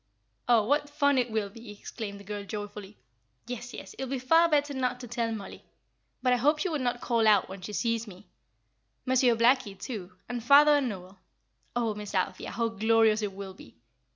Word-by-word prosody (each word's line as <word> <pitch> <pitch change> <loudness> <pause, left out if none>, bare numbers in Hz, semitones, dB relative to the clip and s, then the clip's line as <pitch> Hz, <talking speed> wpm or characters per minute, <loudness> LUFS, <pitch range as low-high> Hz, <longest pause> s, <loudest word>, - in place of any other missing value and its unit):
"Oh, 230 -3 +5
what 290 +4 +1
fun 285 -2 +2
it 245 -1 0
will 215 -3 -2
be!" 230 +1 -12
exclaimed 205 0 -7
the - - -12
girl, 205 0 -5
joyfully. 205 0 -7 0.5
"Yes, 245 0 -6
yes, - - -9
it 265 - -5
will - - -8
be 270 - -1
far 325 +7 +4
better 290 -2 +1
not 250 -2 -1
to 245 - -8
tell 235 0 -2
Mollie; 210 -3 -7 0.6
but 250 -1 +4
I - - +3
hope 295 +5 +3
she 365 +5 -1
will 310 -3 -1
not 245 -1 -1
call 230 -2 +2
out 205 -3 +5
when 190 0 -8
she 210 +3 -7
sees 230 0 -1
me. 195 0 -12 0.8
Monsieur 255 -2 +3
Blackie, 230 -4 +2
too, 195 -8 -6
and 245 -1 -4
father 290 +3 +7
and 270 -3 0
Noel. 190 -1 -9 0.6
Oh, 230 -3 0
Miss 210 -1 -7
Althea, 185 - -1
how 230 +1 -1
glorious 225 0 +3
it 205 -2 -3
will 195 -1 -8
be! 150 - -15
230 Hz, 205 wpm, -28 LUFS, 205-255 Hz, 0.8 s, father